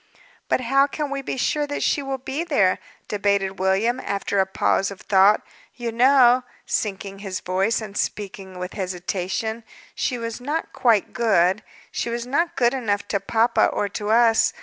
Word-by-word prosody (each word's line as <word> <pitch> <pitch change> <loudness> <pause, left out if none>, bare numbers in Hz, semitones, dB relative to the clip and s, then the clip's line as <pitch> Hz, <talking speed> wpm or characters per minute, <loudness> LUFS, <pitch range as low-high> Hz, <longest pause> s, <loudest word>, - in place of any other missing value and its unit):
"But - - +2
how 275 +3 +3
can 290 0 -4
we 275 0 -2
be 270 - -4
sure 295 +3 0
that 290 - -3
she - - +1
will 270 -1 -3
be 265 +5 -4
there?" 210 - +2 0.3
debated 200 -2 0
William, 195 +7 +1
after 200 0 -2
a 190 - +3
pause 195 0 +1
of 200 - -10
thought. 195 +1 +4 0.3
"You 240 -2 -4
know" 250 +1 +5 0.2
sinking 195 -1 -3
his 195 -2 -4
voice, 190 +5 0
and 210 -2 -8
speaking 195 -3 -4
with 180 0 -5
hesitation 190 +4 -3 0.3
"she 250 - -1
was 230 0 -5
not 295 +5 -3
quite 225 -5 +2
good; 195 -3 +2 0.3
she - - -2
was 235 0 -3
not 335 +7 0
good 240 -4 +3
enough 210 -6 -1
to 200 - +1
papa 225 +4 +2
or 205 - -1
to 205 +1 -4
us. 225 0 +4
220 Hz, 170 wpm, -23 LUFS, 195-255 Hz, 0.3 s, know